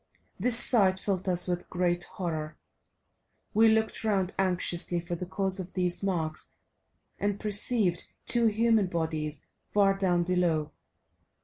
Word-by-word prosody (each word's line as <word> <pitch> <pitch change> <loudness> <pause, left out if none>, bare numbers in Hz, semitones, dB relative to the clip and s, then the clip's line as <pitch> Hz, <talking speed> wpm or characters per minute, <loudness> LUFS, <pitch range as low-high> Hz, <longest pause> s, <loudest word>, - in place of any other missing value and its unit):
This 235 +4 +4
sight 200 -7 +4
filled 190 -1 -2
us 180 0 +4
with 175 -1 -3
great 175 -1 -1
horror; 160 -4 -5 1.0
we 225 +1 +5
looked 220 0 +2
round 195 -4 0
anxiously 180 -2 +1
for 170 +1 -6
the 180 +1 -6
cause 190 +1 -1
of 185 -1 -7
these 180 -1 -1
marks 165 -5 -2 0.6
and 205 0 -1
perceived 210 -3 0 0.2
two 235 -1 +3
human 220 -1 +2
bodies 160 -4 -3 0.2
far 195 -1 +3
down 180 -3 +1
below. 170 -4 0
185 Hz, 130 wpm, -28 LUFS, 175-205 Hz, 1.0 s, we